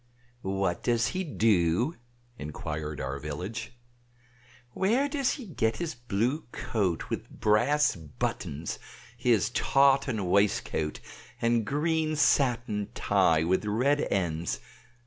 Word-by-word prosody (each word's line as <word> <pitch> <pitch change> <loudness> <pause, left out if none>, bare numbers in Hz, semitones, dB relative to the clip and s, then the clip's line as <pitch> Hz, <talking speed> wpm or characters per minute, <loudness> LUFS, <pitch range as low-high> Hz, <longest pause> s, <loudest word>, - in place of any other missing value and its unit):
"What 95 -3 -1
does 120 -1 +2
he 185 +1 -2
do?" 110 - +2 0.4
inquired 75 0 -5
our 70 +1 -3
village. 100 - -6 0.9
"Where 230 - +2
does 280 -2 0
he 265 - -7
get 115 - -1
his 170 -2 -3
blue 120 +5 -1
coat 95 -7 -2
with - - -3
brass 120 +8 +2
buttons, 75 0 -4 0.4
his 115 -3 +2
tartan 135 -6 +3
waistcoat 90 -5 +1 0.4
and 115 -1 +2
green 155 +4 0
satin 120 -7 +2
tie 80 -1 +3
with 90 +5 +1
red 130 +8 +2
ends? 85 -8 -1
110 Hz, 110 wpm, -28 LUFS, 85-140 Hz, 0.9 s, tartan